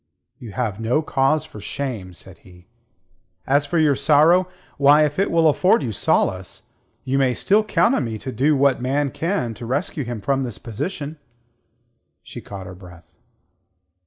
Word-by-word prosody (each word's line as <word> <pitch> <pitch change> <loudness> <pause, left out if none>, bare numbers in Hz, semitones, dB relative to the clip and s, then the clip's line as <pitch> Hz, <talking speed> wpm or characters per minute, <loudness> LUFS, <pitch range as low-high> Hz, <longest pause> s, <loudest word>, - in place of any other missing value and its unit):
"You 115 -5 -10
have 110 -5 -3
no 120 +8 0
cause 150 +2 +1
for 110 - -12
shame," 105 -6 -5
said - - -13
he. 90 -1 -18 0.8
"As 145 +1 +2
for 170 - -1
your 155 -3 +3
sorrow 155 +6 +4 0.3
why, 145 +2 +6
if 150 +3 -3
it 195 - +1
will 165 -1 +3
afford 180 +8 +3
you 120 - -3
solace 95 -2 -1 0.3
you 135 +1 0
may 130 -2 +2
still 210 +2 +2
count 230 +3 +2
on 140 - 0
me 110 -1 -4
to 130 - -7
do 145 +4 +2
what 135 -2 +2
man 140 +2 0
can 165 - -2
to 115 - -9
rescue 145 +3 -2
him 120 -2 -5
from 135 +6 0
this 120 -7 -5
position." 145 - -6 1.0
She - - -10
caught 100 -2 -9
her 95 - -9
breath. 90 -2 -15
135 Hz, 170 wpm, -21 LUFS, 110-155 Hz, 1.0 s, why